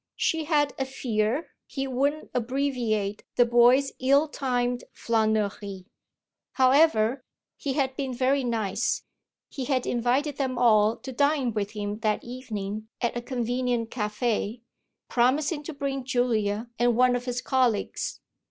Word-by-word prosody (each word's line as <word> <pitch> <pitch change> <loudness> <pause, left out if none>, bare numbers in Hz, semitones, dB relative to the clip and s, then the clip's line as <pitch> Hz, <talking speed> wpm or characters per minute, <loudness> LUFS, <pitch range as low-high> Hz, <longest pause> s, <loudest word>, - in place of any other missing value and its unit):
She 320 -1 0
had 295 -2 +2
a 265 - 0
fear 245 +1 -1 0.2
he 270 -1 -3
wouldn't 280 +4 -1
abbreviate 240 -5 -1
the 245 - +5
boy's 245 +3 +5
ill 275 +4 +4
timed 245 -4 -1
flânerie. 210 -4 -1 0.7
However, 260 -2 +4 0.3
he 275 - -3
had 265 -2 0
been 270 -2 -3
very 260 +2 +1
nice: 225 -2 -1 0.4
he 265 - -5
had 260 -2 0
invited 255 +5 0
them 260 -3 -1
all 220 -2 +4
to 265 - -8
dine 280 -2 +1
with 210 -1 -2
him 205 0 -4
that 215 -1 0
evening 215 -4 -5
at 240 -1 -1
a 240 - -2
convenient 245 -1 -1
café, 220 0 -2 0.5
promising 285 +6 +1
to 325 - -4
bring 275 -2 -3
Julia 235 -4 0
and 240 -1 +3
one 250 0 +4
of 245 0 -3
his 245 -1 -2
colleagues. 250 -5 0
245 Hz, 135 wpm, -26 LUFS, 220-270 Hz, 0.7 s, the